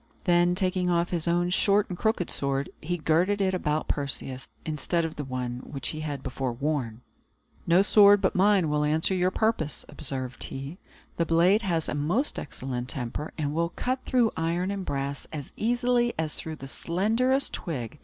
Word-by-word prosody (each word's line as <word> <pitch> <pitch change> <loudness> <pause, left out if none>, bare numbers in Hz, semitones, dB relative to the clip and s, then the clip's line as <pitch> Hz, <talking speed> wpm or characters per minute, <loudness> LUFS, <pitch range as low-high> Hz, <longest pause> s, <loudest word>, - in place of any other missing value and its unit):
Then, 175 -1 +4
taking 185 -1 0
off 170 0 +1
his 170 -2 0
own 175 +1 +2
short 200 +2 +3
and 180 - -4
crooked 220 -2 0
sword, 140 0 -1
he 175 +3 -2
girded 175 +6 +2
it 190 -1 +1
about 155 -4 -1
Perseus, 135 -2 -3 0.2
instead 160 +2 0
of 160 - -5
the 145 - -4
one 125 -2 -4
which 135 +1 -5
he 155 - -5
had 145 -3 -4
before 130 -1 -2
worn. 125 -4 -2 0.7
"No 175 +3 +5
sword 205 0 +7
but - - +1
mine 195 -2 +4
will 150 0 +1
answer 155 +5 +1
your 180 0 +2
purpose," 205 -7 0
observed 130 -4 -4
he; 140 +7 -7 0.4
"the 170 - +2
blade 175 +6 +4
has 170 -6 -1
a - - -2
most 170 - 0
excellent 130 -3 -5
temper, 135 +2 -4
and 145 -2 -1
will 170 +1 +1
cut 255 +7 -2
through 240 -3 +2
iron 170 +4 0
and 195 -2 -4
brass 140 0 -3
as 145 -4 -7
easily 240 +1 +1
as 160 -1 -1
through 160 -1 -5
the 135 - -9
slenderest 225 - 0
twig. 125 -10 -5
165 Hz, 180 wpm, -27 LUFS, 145-190 Hz, 0.7 s, sword